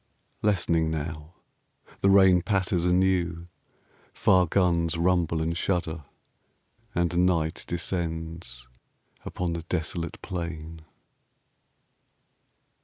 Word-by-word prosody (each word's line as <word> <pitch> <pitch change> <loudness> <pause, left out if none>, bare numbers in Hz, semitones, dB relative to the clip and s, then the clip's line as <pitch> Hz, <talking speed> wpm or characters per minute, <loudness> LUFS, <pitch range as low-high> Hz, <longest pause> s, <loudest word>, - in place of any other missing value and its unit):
Lessening 85 -6 +1
now. 80 +1 -5 0.6
The 100 - +3
rain 95 -2 +6
Patters 95 -3 0
anew. 90 -2 +1 0.7
Far 90 -2 +4
guns 85 -2 +1
rumble 85 -2 +1
and 85 +1 -1
shudder 85 -4 -2 0.9
And 85 +1 +2
night 80 -3 0
descends 80 -7 -4 0.6
upon 90 -2 -3
the 85 - -3
desolate 85 0 -3
plain. 85 -3 -5
85 Hz, 85 wpm, -27 LUFS, 80-90 Hz, 0.9 s, rain